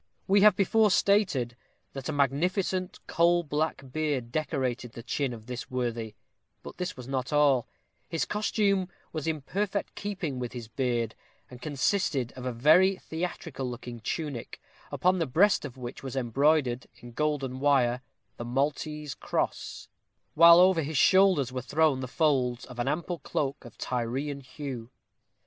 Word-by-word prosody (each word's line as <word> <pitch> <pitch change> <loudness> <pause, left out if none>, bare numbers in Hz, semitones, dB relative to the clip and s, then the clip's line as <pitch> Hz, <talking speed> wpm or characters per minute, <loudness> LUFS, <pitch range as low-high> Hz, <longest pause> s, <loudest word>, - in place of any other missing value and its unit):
We 195 +1 +5
have 210 -2 +7
before 210 +3 +3
stated, 180 - +2 0.4
that 135 +2 -6
a - - +1
magnificent 180 +6 0
coal 170 +1 +3
black 155 -1 -2
beard 145 -5 -1
decorated 130 -5 -2
the 115 - -9
chin 135 +2 -1
of 110 -2 -9
this 125 0 -6
worthy; 115 -4 -3 0.5
but - - -10
this 180 -5 -4
was 125 -1 -9
not 130 -1 -2
all 145 -5 +3 0.4
his 165 -4 -1
costume 200 -3 0 0.2
was 155 -1 -4
in 155 -2 -1
perfect 200 +7 -2
keeping 180 -10 -4
with 125 -1 -4
his 120 -3 -7
beard, 120 -1 -1 0.4
and 125 -1 -11
consisted 145 - 0
of 130 0 -6
a - - -1
very 160 +11 +5
theatrical 160 -6 -5
looking 120 -1 -7
tunic, 140 +1 -4 0.3
upon 185 +1 +2
the 165 - 0
breast 175 +6 +3
of 135 -2 -8
which 120 -1 -7
was 135 -1 -6
embroidered, 130 0 +1
in 120 - -12
golden 135 -2 -1
wire, 130 -3 +3 0.4
the - - -5
Maltese 145 +3 -2
cross; - - -3 0.5
while 170 +1 +8
over 185 -2 +5
his 150 0 -3
shoulders 185 -7 +5
were 130 0 -3
thrown 145 +2 +2
the 130 - -4
folds 130 -4 +1
of 125 -1 -11
an 120 - -1
ample 170 +3 -2
cloak 140 0 -3
of 120 - -13
Tyrian 130 +4 -2
hue. 130 -3 -7
140 Hz, 155 wpm, -28 LUFS, 125-170 Hz, 0.5 s, while